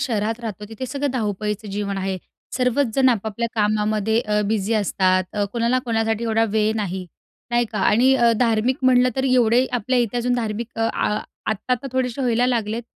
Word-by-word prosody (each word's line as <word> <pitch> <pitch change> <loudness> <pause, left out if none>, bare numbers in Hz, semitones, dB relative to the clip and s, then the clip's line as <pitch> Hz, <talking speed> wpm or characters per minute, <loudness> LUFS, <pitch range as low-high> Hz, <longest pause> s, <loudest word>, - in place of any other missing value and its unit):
शहरात 225 -1 -1
राहतो 210 -3 -6
तिथे 225 +3 -6
सगळं 280 +2 -2
धावपळीचं 210 -2 -3
जीवन 200 0 -3
आहे. 190 0 -2 0.4
सर्वचजण 255 0 +2
आपापल्या 225 0 -1
कामामध्ये 215 0 +1
अ, 210 -2 0
बिझी 215 0 0
असतात. 185 -3 +2
अ, 205 -1 0
कोणाला 235 +2 +1
कोणासाठी 225 -1 0
एवढा 225 0 +2
वेळ 220 0 +2
नाही, 190 -3 -3 0.4
नाही 240 0 +2
का? 215 - -2
आणि 245 +7 +4
अ, 235 -3 +4
धार्मिक 235 +1 +2
म्हटलं 255 -1 +5
तर 265 - 0
एवढे 250 -1 +3
आपल्या 250 +1 0
इथे 240 -1 0
अजून 245 +1 0
धार्मिक 230 0 -4
आ 225 0 0 0.4
आत्ता, 220 +4 -1
आत्ता 250 +2 -1
थोडेसे 255 0 -1
व्हायला 245 0 +2
लागलेत. 230 -2 -1
225 Hz, 170 wpm, -22 LUFS, 210-245 Hz, 0.4 s, म्हटलं